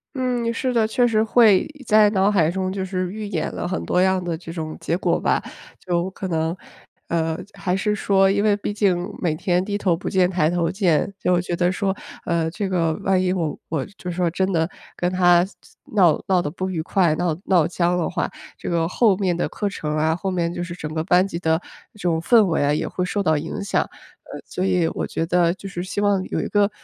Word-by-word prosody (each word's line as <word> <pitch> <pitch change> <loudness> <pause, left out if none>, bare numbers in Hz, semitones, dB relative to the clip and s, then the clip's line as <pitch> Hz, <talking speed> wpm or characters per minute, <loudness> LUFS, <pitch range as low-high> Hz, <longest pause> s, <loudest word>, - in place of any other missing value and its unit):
嗯， 250 -3 0
是 250 +2 -1
的， 225 -2 +3
确 245 +2 +2
实 220 -2 +2
会 220 -4 +5 0.2
在 215 -1 +5
脑 195 0 +3
海 165 -6 +3
中， 185 +1 -2
就 195 - -3
是 185 -1 -3
预 215 0 -5
演 175 -6 -2
了 - - -3
很 185 - -3
多 180 - +2
样 190 -1 +2
的 170 -2 -2
这 165 -1 -9
种 160 -2 -5
结 170 - 0
果 - - +1
吧。 - - +1 0.4
就 175 0 -1
可 190 0 -6
能 160 +1 0 0.5
呃， 160 -1 0 0.2
还 180 -1 -1
是 210 +2 0
说 195 -2 +3
因 200 +1 +1
为 210 -1 +4
毕 205 0 -3
竟 185 -4 +1
每 165 -4 0
天 180 +2 0
低 205 +1 -2
头 185 -4 +1
不 165 - -5
见 185 -1 +3
抬 170 -4 +1
头 170 -1 0
见， 185 -1 +1
就 180 -1 +2
觉 175 -1 -2
得 175 +1 +2
说， 195 +1 -1 0.3
呃， 165 -2 0
这 195 +3 -3
个 165 -4 +1
万 190 -2 +2
一 185 0 +1
我 165 -5 -2
我 150 -5 -1
就 180 - -5
说 175 0 0
真 190 +2 0
的 165 -2 +1 0.3
跟 175 +1 -1
他 175 -1 +4 0.5
闹 175 -7 +4
闹 185 -2 +3
得 145 - -3
不 185 +4 -4
愉 165 -3 -2
快， 175 -1 +2
闹 165 -1 -1
闹 175 -5 +3
僵 175 0 0
了 175 -2 0
话。 180 - -1 0.3
这 - - -8
个 165 -1 +1
后 210 +2 +3
面 180 -4 0
的 - - 0
课 205 - -3
程 150 -6 -4
啊， 160 +1 +1
后 190 +2 -3
面 170 -2 0
就 175 - -4
是 175 -1 -6
整 155 -3 -6
个 155 0 -2
班 180 +2 +4
级 170 - -5
的 160 0 +1 0.3
这 210 - -19
种 170 -3 0
氛 220 +6 +5
围 165 -5 +1
啊， 145 +1 +2
也 - - -1
会 180 - -2
受 200 +2 -1
到 160 -5 +2
影 165 +6 -4
响。 200 - 0 0.4
呃， - - -6
所 180 - -4
以 180 -3 +2
我 - - -3
觉 165 - -2
得 175 0 +3
就 195 - -9
是 175 -2 -5
希 190 +3 -3
望 200 -2 +2
有 - - -3
一 - - -2
个 205 -1 +3
180 Hz, 255 characters per minute, -22 LUFS, 170-195 Hz, 0.5 s, 会